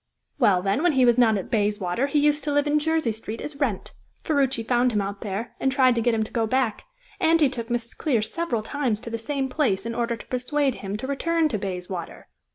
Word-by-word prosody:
"Well, 195 -8 +4
then, 200 +7 +1
when 345 -2 +3
he 260 -2 +4
was 240 0 +4
not 225 -3 +4
at 190 - -6
Bayswater 205 +2 0
he 295 - 0
used 295 0 +3
to 295 - 0
live 290 0 +2
in 300 0 +2
Jersey 320 -5 +1
Street 220 +1 -6
as 295 -1 -6
Wrent. 255 -10 -2 0.3
Ferruci 270 -6 +1
found 245 +2 +2
him 210 - +2
out 200 0 -4
there, 210 +2 -4
and 265 - +1
tried 260 -1 +4
to 235 - 0
get 235 0 +2
him 220 - +1
to 215 - -8
go 225 -2 +1
back, 255 -2 0 0.3
and 330 +1 +4
he 300 - +5
took 235 -3 -5
Mrs. 235 -1 -3
Clear 245 -8 0
several 235 -1 -2
times 250 -4 -1
to 235 - -7
the 230 - -3
same 270 +3 -2
place 255 -8 0
in 230 - -3
order 235 0 -1
to 225 - -12
persuade 265 +2 0
him 195 +1 -4
to 250 - -6
return 320 +4 +1
to 215 -7 -2
Bayswater. 180 -2 -6
240 Hz, 240 wpm, -24 LUFS, 215-285 Hz, 0.3 s, he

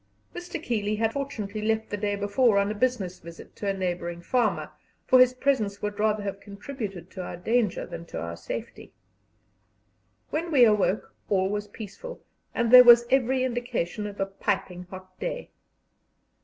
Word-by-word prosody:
Mr. 350 -1 -6
Keeley 215 -7 -1
had 225 +1 0
fortunately 215 -7 -4
left 220 +1 -1
the - - 0
day 205 0 -1
before 205 +2 +2
on 200 +1 +2
a - - -1
business 205 -6 -1
visit 170 0 -12
to 205 - -5
a 195 - +2
neighbouring 175 -2 -3
farmer, 230 +6 0 0.3
for 255 - +5
his 255 0 +6
presence 230 -7 0
would 210 0 -4
rather 215 -1 +1
have 195 -1 -4
contributed 200 - -7
to 185 - -6
our 175 - -6
danger 220 +2 0
than 170 - -8
to - - -6
our 85 0 -5
safety. 85 - -7 1.4
When 335 +2 -2
we 270 -5 +6
awoke 210 -2 +1 0.2
all 190 -2 +2
was 205 0 -3
peaceful, 220 - -9 0.4
and 235 -1 +1
there 250 0 +11
was 240 -1 +8
every 260 0 +3
indication 240 -6 -2
of 205 -1 -9
a 195 - +1
piping 195 -2 -3
hot 185 0 -12
day. - - -4
210 Hz, 170 wpm, -26 LUFS, 195-245 Hz, 1.4 s, there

